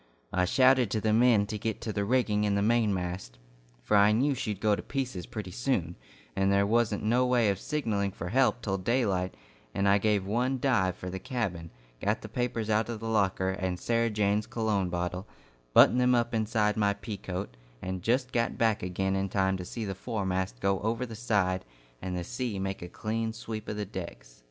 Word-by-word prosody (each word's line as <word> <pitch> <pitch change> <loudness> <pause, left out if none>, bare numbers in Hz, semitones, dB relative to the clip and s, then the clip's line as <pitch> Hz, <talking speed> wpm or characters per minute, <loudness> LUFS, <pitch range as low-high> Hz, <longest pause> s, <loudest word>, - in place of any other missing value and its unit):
I 90 0 +2
shouted 130 +2 +4
to 110 - 0
the 110 0 +1
men 115 -2 +5
to 105 +1 -5
get 110 0 -2
to 110 - -3
the 100 - -1
rigging 105 -2 +1
in 105 -1 +1
the 100 - +1
mainmast, 95 - 0 0.5
for 105 - +1
I 100 +1 +6
knew 135 +7 +2
she'd 110 -6 -3
go 105 -1 +3
to - - -6
pieces 125 -11 -4
pretty 105 -4 -6
soon, 90 -7 -1 0.4
and 95 0 +2
there 100 0 +3
wasn't 110 -1 +1
no 120 +4 +3
way 120 -4 +3
of 95 - -4
signalling 110 -10 -1
for 90 -2 -6
help 125 +1 +2
till 95 -2 -1
daylight, 95 -4 0 0.4
and 100 0 +1
I 100 +1 +5
gave 105 -2 +1
one 125 +6 0
dive 100 -9 +2
for 90 0 -6
the 95 - -4
cabin, 95 -8 -3 0.3
got - - +1
the - - -8
papers 120 -3 -2
out 110 +1 +1
of 115 -2 -4
the 115 - -7
locker, 95 -3 +1
and 95 -2 -3
Sarah 115 +2 +1
Jane's 105 0 +1
cologne 110 -5 0
bottle, 90 +2 -3 0.4
buttoned 125 - +6
them 125 0 +4
up 120 0 0
inside 110 -1 +1
my 100 -1 +2
pea 105 0 -6
coat, 90 -7 -5 0.2
and 95 +3 -4
just 125 +6 +1
got 115 -1 0
back 110 -2 +2
again 95 +1 -1
in 95 0 -1
time 95 0 +1
to 90 - -6
see 110 +4 -5
the 95 - -3
foremast 95 - -3
go 95 +4 +1
over 115 +4 -1
the 115 - -9
side 100 -5 0 0.4
and 90 -1 -3
the 90 - -3
sea 125 -1 -3
make 95 0 -3
a 90 - -6
clean 110 +4 -3
sweep 110 -1 -6
of 105 - -3
the 105 - -2
decks. - - -8
105 Hz, 210 wpm, -29 LUFS, 95-115 Hz, 0.5 s, I